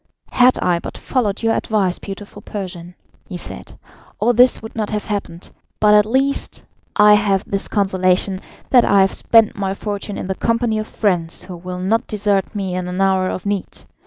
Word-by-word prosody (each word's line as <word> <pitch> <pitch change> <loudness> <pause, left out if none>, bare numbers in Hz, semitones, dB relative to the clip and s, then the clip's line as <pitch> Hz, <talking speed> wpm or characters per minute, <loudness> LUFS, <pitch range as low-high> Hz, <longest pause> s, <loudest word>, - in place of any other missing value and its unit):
"Had 250 0 +4
I 175 -1 +2
but - - -8
followed 225 -5 -1
your 225 0 +3
advice, 195 -5 0
beautiful 205 +1 -9
Persian," 180 -4 -7 0.3
he 180 - -5
said, - - -10 0.4
"all 245 - +2
this 250 +2 +5
would 220 - -10
not 215 -2 -2
have 210 -1 -3
happened, 195 -5 -5 0.3
but 210 -1 +5
at 210 0 +5
least 270 +4 -1 0.3
I 210 0 +7
have 205 -1 +2
this 195 -1 -2
consolation, 190 -1 +1 0.3
that 245 -2 +6
I 200 -1 +4
have 190 - +2
spent 225 -2 +3
my 195 -1 -2
fortune 205 0 -5
in - - -5
the 190 - -2
company 230 +1 0
of 215 - -4
friends 175 -6 -1
who 180 -1 -8
will 180 +1 -7
not 220 +6 0
desert 205 -1 -1
me 195 -3 -3
in 180 0 -3
an 180 +1 -4
hour 190 -1 +2
of 185 - -5
need. 200 -1 -4
200 Hz, 190 wpm, -19 LUFS, 185-215 Hz, 0.4 s, I